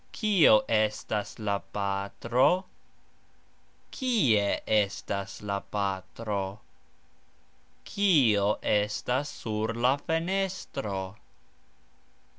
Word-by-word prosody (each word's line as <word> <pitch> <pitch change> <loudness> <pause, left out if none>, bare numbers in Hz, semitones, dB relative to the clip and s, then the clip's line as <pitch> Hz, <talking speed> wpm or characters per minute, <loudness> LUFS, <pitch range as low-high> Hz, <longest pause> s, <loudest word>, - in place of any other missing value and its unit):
Kio 195 - +5
estas 110 -1 0
la 100 -2 -1
patro? 105 - +1 1.3
Kie 140 - +2 0.2
estas 100 -2 -1
la 100 -1 -2 0.2
patro? 100 0 -3 1.3
Kio 135 - +3 0.2
estas 115 +7 0
sur 110 +1 -3
la 125 +3 +3
fenestro? 165 - -2
110 Hz, 65 wpm, -28 LUFS, 100-145 Hz, 1.3 s, Kio